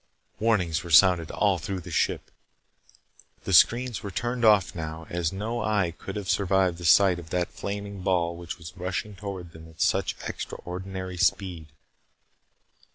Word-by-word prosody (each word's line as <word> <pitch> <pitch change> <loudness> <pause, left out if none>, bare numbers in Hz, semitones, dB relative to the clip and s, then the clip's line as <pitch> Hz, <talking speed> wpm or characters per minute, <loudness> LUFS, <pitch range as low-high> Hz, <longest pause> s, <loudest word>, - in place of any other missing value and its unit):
Warnings 95 -8 +1
were 85 - -8
sounded 85 0 +6
all 100 -4 +1
through 95 +3 -4
the 85 +1 -10
ship. - - -1 1.1
The - - -2
screens 120 0 +4
were 100 - -5
turned 120 +5 -3
off 105 -5 +5
now, 80 0 -6
as 85 -2 -1
no 110 +5 -3
eye 100 -6 0
could 95 - -8
have 105 -3 -5
survived 95 -3 +1
the 90 - -7
sight 90 +2 +5
of 80 -2 -11
that 90 0 -1
flaming 100 -1 -5
ball 85 -2 0
which 85 -1 -7
was 80 -3 -11
rushing 95 +3 -4
toward 95 -3 -7
them 80 0 -13
at 80 - -19
such - - +1
extraordinary 95 0 -6
speed. 85 -3 0
95 Hz, 160 wpm, -26 LUFS, 85-100 Hz, 1.1 s, sounded